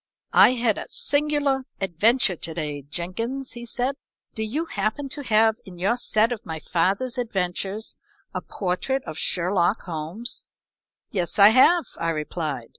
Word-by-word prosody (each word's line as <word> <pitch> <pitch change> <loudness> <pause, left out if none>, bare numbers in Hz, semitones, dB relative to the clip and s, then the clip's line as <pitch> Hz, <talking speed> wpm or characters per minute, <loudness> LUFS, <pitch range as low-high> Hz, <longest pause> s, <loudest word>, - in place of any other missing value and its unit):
"I - - +7
had 235 -4 +1
a - - -7
singular 290 -2 +1 0.2
adventure 195 +3 +3
to 165 0 -7
day, 150 -3 -3
Jenkins," 230 - -3
he 240 0 -7
said. 255 +4 -1 0.4
"Do 220 - -5
you 260 +10 -2
happen 215 +2 -2
to 290 - -5
have 220 -3 +3
in 180 -2 -12
your 195 +7 +1
set 225 -1 +2
of 235 -2 -4
my 160 -7 -5
father's 195 - 0
adventures 195 -1 -3 0.3
a - - -3
portrait 205 +8 -2
of 155 -2 -7
Sherlock 180 +2 +1
Holmes?" 175 +9 -3 0.6
"Yes, 180 -2 -1
I 200 0 +9
have," 270 +8 +5
I 165 - 0
replied. 150 -5 -3
215 Hz, 150 wpm, -24 LUFS, 175-250 Hz, 0.6 s, I